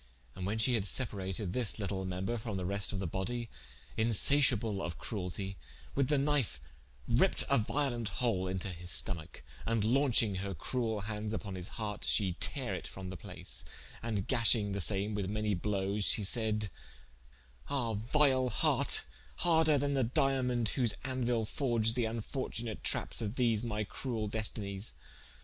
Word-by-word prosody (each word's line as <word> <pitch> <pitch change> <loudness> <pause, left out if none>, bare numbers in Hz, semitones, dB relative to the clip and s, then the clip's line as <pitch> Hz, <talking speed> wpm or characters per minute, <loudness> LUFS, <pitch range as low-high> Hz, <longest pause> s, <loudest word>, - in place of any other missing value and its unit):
And 95 0 -4
when 105 +2 -1
shee 115 +3 +3
had 105 -4 +1
separated 95 -3 0
this 120 -5 +2
litle 100 -2 -2
member 95 +5 -2
from 110 -3 -4
the 90 - -3
reste 100 +2 +1
of 100 - -3
the 95 - -2
body 115 +7 -3 0.5
(insaciable 115 -2 +4
of 85 -2 -4
crueltie) 95 -2 -4 0.4
with 140 -1 +2
the 150 - +3
knife 135 - +1 0.5
ripped - - +3
a - - +4
violent 120 -1 -1
hole 95 -3 0
into 95 +1 -2
his 90 -1 -8
stomacke, 85 -5 -2 0.2
and 115 -2 +1
launching 120 -3 +3
her 100 -1 -3
cruel 110 - -1
handes 105 +1 -3
vpon 100 -3 -5
his 90 -1 -4
harte 105 -2 -4
she 95 -5 +2
tare - - 0
it - - -5
from 95 -1 -7
the - - -6
place, - - -2 0.4
and 110 -4 -2
gashing 115 -5 +3
the 100 0 -1
same 100 +3 +1
with 100 -2 -2
many 105 0 0
blowes, 100 +2 -1
she 105 - +3
said: 110 0 0 1.0
"Ah, 125 -5 +1
vile 130 +4 +3
hart, 105 - +2 0.3
harder 160 -3 +4
then 140 +1 0
the 135 -2 +2
Diamont 125 -1 +1
whose 120 -6 +2
andeuile 120 -4 0
forged 115 -4 +1
the 120 -1 0
infortunate 115 0 -4
trappes - - +2
of 110 +1 -3
these 115 -4 +2
my 105 -2 -1
cruel 110 0 -3
destenies! 105 -1 -3
110 Hz, 160 wpm, -33 LUFS, 100-120 Hz, 1.0 s, insaciable